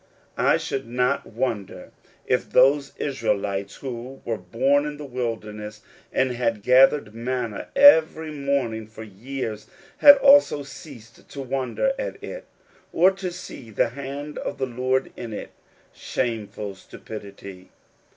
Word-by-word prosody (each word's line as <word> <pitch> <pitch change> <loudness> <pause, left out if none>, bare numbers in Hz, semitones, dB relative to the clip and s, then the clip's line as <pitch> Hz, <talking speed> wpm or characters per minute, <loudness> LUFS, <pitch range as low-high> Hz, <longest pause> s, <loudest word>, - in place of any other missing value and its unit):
I - - +4
should 135 -3 -4
not 125 +3 0
wonder 110 -4 -4 0.3
if - - 0
those 140 +2 +4
Israelites 100 -8 -2
who 130 0 -7
were 115 - -1
born 130 +10 +1
in 150 0 -6
the 150 - -8
wilderness 110 -4 -5 0.3
and 130 -1 +1
had 115 -4 -1
gathered 130 -1 +5
manna 120 -2 -3
every 160 - +6
morning 140 -7 -2
for 110 0 -10
years, 110 +1 -6 0.3
had 285 -1 +10
also 275 - +5
ceased 130 -5 -13
to 140 - -7
wonder 135 - -1
at - - -5
it, - - -8 0.4
or 180 +3 +5
to 190 -1 -5
see 170 -9 -10
the 110 +2 +1
hand 140 +3 -7
of - - -5
the 135 - -1
Lord 130 +1 -1
in 115 -2 -7
it. - - -7 0.4
Shameful 105 -4 -3
stupidity! 100 -1 -11
125 Hz, 130 wpm, -24 LUFS, 110-140 Hz, 0.4 s, had